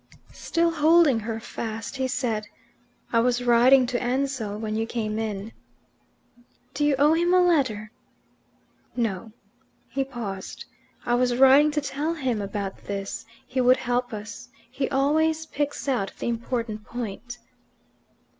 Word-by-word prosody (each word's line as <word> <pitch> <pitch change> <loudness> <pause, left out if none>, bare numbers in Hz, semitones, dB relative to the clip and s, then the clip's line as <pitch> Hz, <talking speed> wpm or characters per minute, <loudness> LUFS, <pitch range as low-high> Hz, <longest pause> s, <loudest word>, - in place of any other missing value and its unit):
Still 335 0 0
holding 320 -4 +4
her 225 +1 -4
fast, 225 +2 -6
he 260 -1 0
said, 230 -5 -2 0.7
"I 230 - +5
was 245 +1 +1
writing 245 +2 +6
to 245 0 -2
Ansell 250 -4 -1
when 215 0 -3
you 225 +1 -1
came 220 -2 -2
in." 215 -1 -4 1.2
"Do 295 - -1
you 290 -1 +3
owe 295 +3 +5
him 345 +2 +3
a - - +6
letter?" 260 -12 +2 1.0
"No." 225 -3 -2 0.6
He 270 +3 -1
paused. 225 -8 -6 0.4
"I 240 - +1
was 245 0 +2
writing 270 +3 +7
to 300 0 -1
tell 290 +4 -2
him 255 -8 -1
about 200 -1 -5
this. 200 +2 -5 0.2
He 255 0 -1
would 255 +1 +5
help 245 0 -1
us. 215 +1 -8 0.2
He 265 +1 -2
always 315 +4 +2
picks 290 -1 -3
out 240 -8 0
the - - -2
important 230 -2 -3
point." 240 +1 -6
245 Hz, 140 wpm, -25 LUFS, 220-275 Hz, 1.2 s, writing